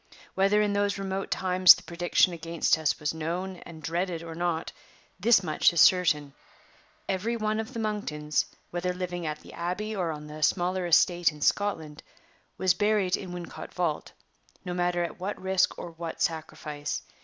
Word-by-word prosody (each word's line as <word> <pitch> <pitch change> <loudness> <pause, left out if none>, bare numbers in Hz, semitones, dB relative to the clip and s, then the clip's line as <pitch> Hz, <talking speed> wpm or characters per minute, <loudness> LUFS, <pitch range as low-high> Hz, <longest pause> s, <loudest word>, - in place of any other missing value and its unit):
Whether 200 +2 +3
in 205 -1 0
those 205 0 +1
remote 195 0 -3
times 185 -1 +6
the - - -12
prediction 175 +1 +2
against 165 0 +1
us 160 -2 0
was 150 -1 -1
known 175 +4 -4
and 160 -2 -12
dreaded 170 +2 -2
or 165 -1 -7
not, 170 -1 -2 0.5
this 230 -4 +5
much 155 -3 +3
is 170 - 0
certain: 150 -6 +4 0.7
every 210 +5 -1
one 215 0 -1
of 220 +3 -4
the - - -2
Monktons 155 -9 -1 0.3
(whether 180 +1 -1
living 180 -2 -4
at 150 0 -4
the - - -13
Abbey 190 +6 -3
or 180 -4 -1
on 150 -1 -5
the 150 +1 -9
smaller 180 +2 +1
estate 175 0 +4
in 150 - -13
Scotland) 160 -6 0 0.6
was 185 -2 +3
buried 205 -1 +2
in 185 -2 -7
Wincot 175 -1 -8
vault, 170 -4 -1 0.5
no 180 - -3
matter 175 0 0
at 170 - -6
what 195 +3 -4
risk 190 -1 +1
or 170 - -7
what 165 0 -7
sacrifice. 155 -2 -3
175 Hz, 170 wpm, -28 LUFS, 160-190 Hz, 0.7 s, times